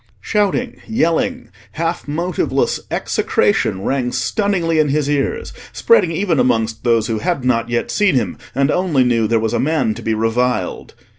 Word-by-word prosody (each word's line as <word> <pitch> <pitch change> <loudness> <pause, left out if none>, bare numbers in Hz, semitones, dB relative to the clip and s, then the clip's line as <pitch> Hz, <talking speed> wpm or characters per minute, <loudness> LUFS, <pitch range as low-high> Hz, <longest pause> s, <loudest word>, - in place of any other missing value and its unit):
Shouting, 210 +3 -1
yelling, 230 +3 0 0.2
half 165 0 -3
motiveless 170 +4 -1
execration 95 +1 0
rang 130 -1 -1
stunningly 180 - 0
in 150 -2 +3
his 145 0 0
ears, 145 - -1 0.2
spreading 465 - +3
even 165 -2 0
amongst 110 -2 0
those 115 -3 +2
who 110 -2 -2
had 170 -5 -2
not 120 -2 +1
yet 120 0 -1
seen 205 -7 +2
him, 125 - -1 0.2
and 140 +2 +2
only 175 -8 +2
knew 115 -3 +2
there 115 +1 +2
was 110 0 -1
a - - +1
man 135 -6 +1
to - - -9
be 110 - -1
reviled. 115 -2 -1
140 Hz, 160 wpm, -18 LUFS, 115-175 Hz, 0.2 s, in